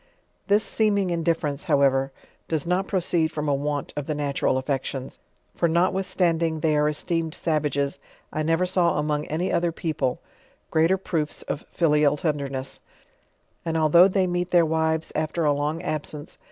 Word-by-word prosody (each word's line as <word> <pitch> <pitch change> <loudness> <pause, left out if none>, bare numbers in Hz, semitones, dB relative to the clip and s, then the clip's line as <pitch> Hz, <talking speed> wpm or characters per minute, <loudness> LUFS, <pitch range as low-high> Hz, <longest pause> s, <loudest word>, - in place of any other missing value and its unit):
This 205 +1 +4
seeming 200 -5 +1
indifference, 165 -3 -1
however, 135 -4 +2 0.4
does 160 -3 -1
not 180 +2 0
proceed 170 -4 +1
from 150 0 -3
a 145 - +2
want 145 +1 -2
of 145 -1 -4
the 155 - -1
natural 140 -2 0
affections, 135 0 -3 0.3
for, 170 - +1
notwithstanding 170 -2 +1
they 155 -1 +2
are 150 0 +3
esteemed 165 +1 -2
savages, 145 -3 -1 0.3
I 155 - -1
iiovor 165 +2 +1
s,uv 180 -2 +2
among 150 0 -1
any 170 +5 -1
other 170 0 +1
people 155 -6 -2 0.5
greater 165 +4 +3
proofs 160 -5 -3
of 145 - -5
filial 150 -3 +3
tnmteni?; 140 -4 -3 0.8
and, 165 -1 -1
although 160 +3 +6
they 190 -1 +1
meet 175 0 -1
their 175 -2 +4
wives 160 0 0
after 155 +1 -1
a 145 - +4
long 150 +4 -2
aba 155 -3 -1 0.2
?nbo 145 - -11
160 Hz, 155 wpm, -24 LUFS, 150-170 Hz, 0.8 s, although